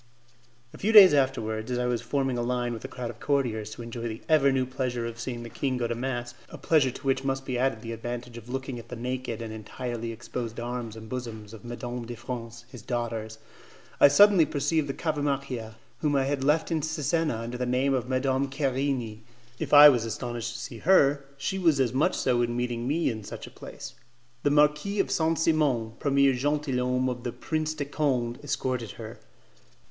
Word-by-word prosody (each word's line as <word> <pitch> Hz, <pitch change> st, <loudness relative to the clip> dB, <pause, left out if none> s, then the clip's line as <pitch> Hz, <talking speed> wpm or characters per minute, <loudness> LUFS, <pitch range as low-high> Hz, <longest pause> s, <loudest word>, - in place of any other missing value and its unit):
A -, -, -11 dB
few 215 Hz, -, +1 dB
days 200 Hz, -7 st, +10 dB
afterwards, 115 Hz, -5 st, 0 dB
as 125 Hz, -, -1 dB
I 125 Hz, -, 0 dB
was 120 Hz, -2 st, 0 dB
forming 135 Hz, +1 st, -1 dB
a 120 Hz, -, -1 dB
line 120 Hz, 0 st, -1 dB
with 115 Hz, -, -7 dB
a -, -, -4 dB
crowd 125 Hz, -2 st, -5 dB
of 115 Hz, -, -17 dB
courtiers 120 Hz, -7 st, 0 dB
to 120 Hz, -, -8 dB
enjoy 115 Hz, 0 st, -5 dB
the 110 Hz, 0 st, -7 dB
ever 150 Hz, -4 st, +5 dB
new 130 Hz, -1 st, +1 dB
pleasure 125 Hz, -2 st, -3 dB
of 115 Hz, 0 st, -6 dB
seeing 120 Hz, -1 st, -4 dB
the 115 Hz, -, -8 dB
king 130 Hz, -2 st, -1 dB
go 120 Hz, -, -1 dB
to 120 Hz, -, -1 dB
mass, 120 Hz, 0 st, -3 dB, 0.2 s
a -, -, -9 dB
pleasure 150 Hz, -5 st, +3 dB
to 125 Hz, -, -9 dB
which 135 Hz, 0 st, +1 dB
must 135 Hz, 0 st, -2 dB
be 130 Hz, -, -3 dB
added 125 Hz, -4 st, 0 dB
the 115 Hz, -, -5 dB
advantage 120 Hz, +1 st, -6 dB
of 120 Hz, 0 st, -10 dB
looking 130 Hz, -1 st, -4 dB
at 115 Hz, 0 st, -13 dB
the 125 Hz, -, -5 dB
naked 125 Hz, -1 st, -4 dB
and 110 Hz, -1 st, -6 dB
entirely 115 Hz, +2 st, -5 dB
exposed 115 Hz, 0 st, -6 dB
arms 120 Hz, -2 st, -4 dB
and 110 Hz, 0 st, -10 dB
bosoms 110 Hz, -3 st, -6 dB
of 110 Hz, -, -11 dB
Mesdames 120 Hz, 0 st, -6 dB
de 120 Hz, -, -6 dB
France, 120 Hz, 0 st, -7 dB
his 125 Hz, -, -10 dB
daughters, 115 Hz, -2 st, -3 dB, 0.6 s
I -, -, +9 dB
suddenly 195 Hz, +4 st, +7 dB
perceived 150 Hz, 0 st, 0 dB
the 135 Hz, -, -2 dB
Cavamacchia, 140 Hz, -7 st, -2 dB, 0.2 s
whom 150 Hz, -2 st, +1 dB
I 135 Hz, -, +3 dB
had 135 Hz, 0 st, -1 dB
left 155 Hz, +4 st, +2 dB
in 160 Hz, -2 st, +1 dB
Cesena 160 Hz, -1 st, 0 dB
under 115 Hz, +2 st, -5 dB
the 125 Hz, -, -1 dB
name 130 Hz, +2 st, +2 dB
of 125 Hz, -1 st, -1 dB
Madame 130 Hz, +1 st, +1 dB
Querini. 135 Hz, -5 st, -1 dB, 0.4 s
If -, -, -4 dB
I 145 Hz, 0 st, +11 dB
was 120 Hz, -5 st, +2 dB
astonished 120 Hz, 0 st, -4 dB
to 120 Hz, -, -7 dB
see 120 Hz, -1 st, -7 dB
her, 145 Hz, -5 st, +4 dB
she 190 Hz, +8 st, -2 dB
was 165 Hz, -6 st, +3 dB
as 125 Hz, -2 st, +2 dB
much 155 Hz, +8 st, +2 dB
so 125 Hz, -2 st, +2 dB
in 120 Hz, 0 st, -1 dB
meeting 120 Hz, -1 st, -2 dB
me 155 Hz, +1 st, +1 dB
in 110 Hz, -2 st, -6 dB
such -, -, -8 dB
a -, -, -12 dB
place. -, -, -9 dB, 0.5 s
The -, -, +2 dB
Marquis 150 Hz, +7 st, +2 dB
of -, -, +1 dB
Saint 160 Hz, 0 st, +1 dB
Simon, 145 Hz, -9 st, +2 dB
premier 140 Hz, -1 st, +3 dB
'gentilhomme' 130 Hz, -2 st, 0 dB
of 125 Hz, -1 st, -3 dB
the 120 Hz, -, -2 dB
Prince 155 Hz, +4 st, -2 dB
de 145 Hz, -2 st, -3 dB
Conde, 130 Hz, -4 st, -1 dB
escorted 130 Hz, -5 st, -2 dB
her. 115 Hz, 0 st, -9 dB
125 Hz, 210 wpm, -27 LUFS, 120-140 Hz, 0.6 s, I